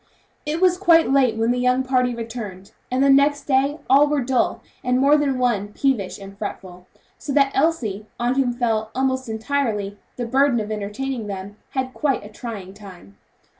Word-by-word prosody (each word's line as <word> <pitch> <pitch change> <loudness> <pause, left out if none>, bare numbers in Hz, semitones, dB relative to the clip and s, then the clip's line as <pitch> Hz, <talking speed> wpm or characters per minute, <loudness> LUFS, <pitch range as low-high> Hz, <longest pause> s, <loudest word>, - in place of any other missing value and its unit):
It 310 +2 -1
was 365 -1 +3
quite 335 -6 +5
late 260 -5 +3
when 225 +1 +2
the 250 - 0
young 250 +1 +2
party 250 -2 +1
returned, 220 -5 -7 0.2
and 255 +2 +1
the 275 - +4
next 285 +1 +4
day 275 +2 +1
all 280 +3 +6
were 290 -2 0
dull, 255 0 0 0.2
and 250 0 +1
more 280 +3 +5
than 285 -3 +1
one 235 -5 +1
peevish 245 -9 0
and 195 0 -11
fretful; 185 -3 -7 0.3
so 285 - -5
that 275 -1 +3
Elsie, 240 -10 0
on 240 +1 +1
whom 265 -2 +1
fell, 225 -3 -1
almost 260 -1 -1
entirely, 220 -4 -2 0.2
the 245 - -3
burden 260 +1 +2
of 215 0 -4
entertaining 215 +3 -4
them, 195 0 -6 0.2
had 260 -1 -2
quite 280 -8 -1
a - - -9
trying 215 -4 -8
time. 185 - -13
250 Hz, 180 wpm, -22 LUFS, 210-275 Hz, 0.3 s, all